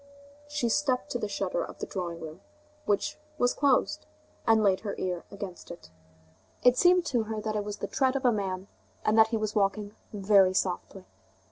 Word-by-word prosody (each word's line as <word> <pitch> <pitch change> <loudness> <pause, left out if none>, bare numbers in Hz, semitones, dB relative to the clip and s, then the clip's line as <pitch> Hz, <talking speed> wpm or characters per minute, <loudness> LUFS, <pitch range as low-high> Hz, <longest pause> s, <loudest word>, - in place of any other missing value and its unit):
She 295 -4 -1
stepped 255 -4 0
to 245 - -1
the 210 - -2
shutter - - -2
of - - -9
the - - -4
drawing 170 -3 -5
room, 160 +3 -8 0.5
which 300 +9 0 0.2
was 245 -3 +2
closed, 280 -3 +1 0.4
and 225 -1 +5
laid 190 -2 +3
her 205 -2 -4
ear 180 -2 -3
against 200 -3 -8
it. 175 - -11 0.7
It 250 0 +6
seemed 355 +3 +5
to 240 -5 0
her 220 0 -4
that 215 0 -3
it 210 - 0
was 205 0 -5
the - - -4
tread 265 -1 +1
of 270 -1 -2
a 245 - +6
man, 190 -3 -3 0.4
and 215 - +3
that 220 - +8
he 225 0 -1
was 215 -1 -2
walking 205 0 0 0.2
very 195 -2 +4
softly. 185 +1 -2
210 Hz, 195 wpm, -28 LUFS, 195-245 Hz, 0.7 s, that